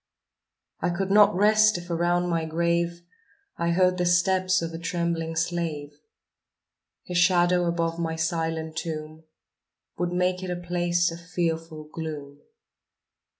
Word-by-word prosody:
I 175 - 0
could 190 +2 -2
not 205 -1 +6
rest 210 +1 +4
if 175 0 -8
around 175 +1 +1
my 165 -2 0
grave 170 +1 -1 0.6
I 170 - +1
heard 180 +1 +2
the 180 - +1
steps 185 +1 +3
of 165 0 -4
a 165 - -5
trembling 170 -2 -2
slave; 160 -3 -2 1.1
His 180 -1 -1
shadow 180 -1 +4
above 170 -1 -1
my 165 -1 -2
silent 160 -1 -2
tomb 155 -1 -5 0.7
Would 175 0 0
make 180 +1 0
it 185 - -5
a 180 - -1
place 175 0 0
of 170 +1 -9
fearful 165 -2 -3
gloom. 145 -3 -6
170 Hz, 135 wpm, -26 LUFS, 165-180 Hz, 1.1 s, not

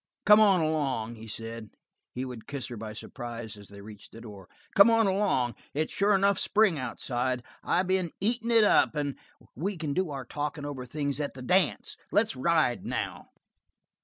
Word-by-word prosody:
"Come 210 +1 +8
on 195 -5 +5
along," 140 -8 -1
he 115 -1 -11
said. 115 0 -6 0.4
He 130 +1 -4
would 125 -4 -9
kiss 140 -2 -5
her 120 - -6
by 110 -1 -7
surprise 115 -1 -7
as 100 -1 -13
they 100 0 -12
reached 105 0 -12
the 115 - -10
door. 100 -5 -11 0.3
"Come 200 +3 +8
on 225 -1 +4
along. 190 - +1 0.2
It's 155 +2 -1
sure 200 +1 +3
enough 200 0 +3
spring 205 -7 +3
outside. 125 -1 -2 0.2
I 180 - +2
been 185 -2 0
eating 230 +3 0
it 230 -2 +6
up, 205 - +4
and 145 -2 -1 0.4
we 190 - -3
can 155 -3 -3
do 185 +2 0
our 135 -3 -5
talking 145 +2 -4
over 135 -3 -6
things 140 +1 -2
at 145 -3 -3
the 130 - -8
dance. 180 +7 +1
Let's 215 +3 +2
ride 155 -3 +1
now." - - -4
145 Hz, 185 wpm, -28 LUFS, 120-190 Hz, 0.4 s, Come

